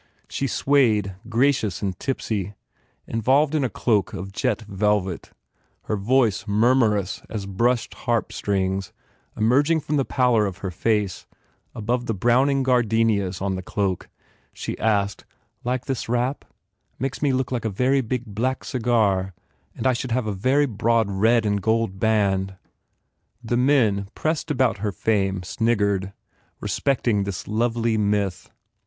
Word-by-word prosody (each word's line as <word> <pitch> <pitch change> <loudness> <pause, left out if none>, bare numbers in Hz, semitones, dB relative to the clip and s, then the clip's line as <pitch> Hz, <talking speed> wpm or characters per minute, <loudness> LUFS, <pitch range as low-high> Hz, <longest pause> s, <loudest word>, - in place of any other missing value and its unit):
She 135 - -2
swayed, 115 -8 +2 0.2
gracious 115 -6 +1
and 95 -2 -1
tipsy, 105 -7 -3 0.5
involved 135 +7 +2
in 155 -3 +1
a 130 - 0
cloak 105 -2 0
of 95 0 -6
jet 115 +1 -1
velvet, 100 -3 -1 0.5
her 110 - -2
voice 115 0 +1
murmurous 105 -2 +2
as 105 -3 -4
brushed 115 +5 0
harp 120 -2 -1
strings 95 -1 -1 0.5
emerging 145 +9 +3
from 150 +1 -1
the 135 - +2
pallor 125 -6 +2
of 95 -2 -6
her 95 - -2
face 105 0 -1 0.5
above 120 +3 -2
the 115 - -1
browning 130 +6 +3
gardenias 115 -6 +1
on 100 -1 0
the 95 - -3
cloak. 95 -1 -2 0.4
She - - -5
asked, 100 -2 0 0.4
"Like 125 0 -2
this 130 -4 -3
wrap? 125 +3 -1 0.5
Makes 135 +2 -3
me 145 - +2
feel 130 0 +1
like 120 -3 -2
a - - +1
very 130 +7 +2
big 125 0 -3
black 120 +5 -2
cigar 110 -8 +1 0.5
I 130 - +4
should 120 0 -3
have 125 -1 0
a 105 - -1
very 130 +9 +2
broad 115 -3 +1
red 110 +4 +3
and 100 -1 0
gold 110 -2 0
band." 95 -3 +1 0.9
The 120 +1 -1
men 120 -7 +3
pressed 155 0 -1
about 130 -7 +1
her 105 0 -1
fame 95 -2 0
sniggered, 100 -2 0 0.5
respecting 120 -7 0
this 100 -2 -5
lovely 115 0 0
myth. 100 -3 -1
110 Hz, 140 wpm, -23 LUFS, 100-125 Hz, 0.9 s, I